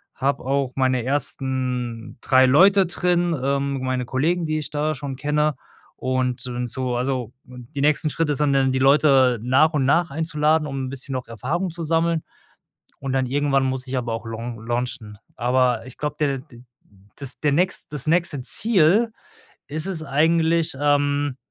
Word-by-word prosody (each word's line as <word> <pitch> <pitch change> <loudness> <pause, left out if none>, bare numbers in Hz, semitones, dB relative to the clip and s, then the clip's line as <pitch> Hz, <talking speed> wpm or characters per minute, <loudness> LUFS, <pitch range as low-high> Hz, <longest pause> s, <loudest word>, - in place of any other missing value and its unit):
Habe 140 -1 -1
auch 135 -1 0
meine 130 -2 +1
ersten 130 -3 -2
3 130 -1 +5
Leute 190 +9 +5
drin, 175 -1 0
ähm, 140 0 -1
meine 130 -1 -2
Kollegen, 160 +8 0
die 155 0 -1
ich 150 - -5
da 150 +1 -1
schon 135 -1 -6
kenne 150 +1 0 0.4
und 130 -1 -1
d 125 0 -3
so 125 0 -3
also, 125 -1 -2
die 125 +3 -8
nächsten 150 +1 +2
Schritte 150 0 0
sind 145 0 +1
dann 135 -1 +2
die 130 - 0
Leute 135 -3 +4
nach 135 +7 +3
und 140 -3 +1
nach 170 +4 +2
einzuladen, 155 0 +1
um 135 -2 -4
'n - - -6
bisschen 135 0 -6
noch 130 -1 -4
Erfahrung 140 - -3
zu 170 +1 -6
sammeln. 165 0 +1 0.8
Und 135 -1 -4
dann 130 -1 +1
irgendwann 135 +1 +1
muss 130 0 -2
ich 130 - -2
aber 120 -2 -3
auch 115 +1 -6
laun 115 0 -6
launchen. 120 -3 -4 0.2
Aber 125 -1 +1
ich 130 - -11
glaube, 150 0 -3
der 140 -3 +1
d 125 -3 -15 0.5
das 140 -2 -8
der 145 -2 +1
nächst 180 +6 +1
das 145 -2 -4
nächste 165 -4 +1
Ziel 210 - +3 0.6
ist 155 +2 -1
es 175 -5 -1
eigentlich, 160 +2 +2
ähm 145 -1 +1
140 Hz, 170 wpm, -22 LUFS, 130-155 Hz, 0.8 s, 3